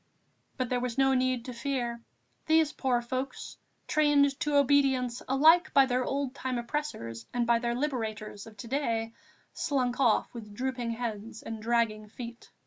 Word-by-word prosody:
But 255 -2 -1
there 250 - +1
was 245 -1 -3
no 270 0 +4
need 255 -2 +1
to 250 - -6
fear; 240 -2 -2 0.5
these 315 -1 +4
poor 245 -3 0
folks, 255 +3 -4 0.3
trained 285 -2 +3
to 295 -1 0
obedience 265 -3 +3
alike 315 +7 +5
by 275 - +7
their 255 0 0
old 275 0 -2
time 260 -2 -3
oppressors 235 - -4
and 240 -1 +2
by 235 0 +3
their 235 0 -1
liberators 220 -6 -3
of 215 -1 -14
to 215 - -8
day, 230 -4 -1 0.4
slunk 255 -5 -1
off 240 -5 +2
with 210 -4 -9
drooping 250 -1 -2
heads 225 -1 -5
and 225 -1 -6
dragging 225 -2 0
feet. 235 +2 -9
245 Hz, 160 wpm, -29 LUFS, 230-275 Hz, 0.5 s, by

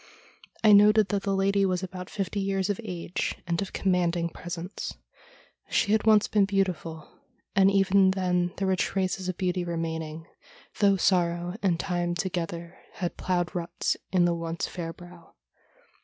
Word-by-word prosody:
I 215 - +7
noted 210 0 +6
that 200 -2 0
the 195 0 -1
lady 195 +1 +2
was 185 -1 0
about 180 -1 -6
fifty 200 0 -3
years 195 0 0
of 205 - -4
age, 180 -3 -3
and 170 0 -1
of 195 - -4
commanding 175 -2 +1
presence. 175 +2 -6 0.7
She 200 - +1
had 220 0 +2
once 215 -1 +6
been 205 -2 +3
beautiful, 185 -5 -2 0.5
and 195 0 +6
even 195 -1 +4
then 180 -2 0
there 195 - -1
were 190 - +3
traces 185 0 -1
of 180 - -3
beauty 180 -1 -1
remaining, 160 -2 -4 0.5
though 200 -1 +4
sorrow 175 -1 +1
and 175 -4 +1
time 175 -2 -1
together 170 -1 -4
had 175 -2 -3
ploughed 175 -3 -1
ruts 175 0 -1 0.2
in 180 -2 +4
the 175 - +2
once 165 0 -3
fair 165 -2 -5
brow. 175 0 -15
180 Hz, 155 wpm, -27 LUFS, 170-195 Hz, 0.7 s, I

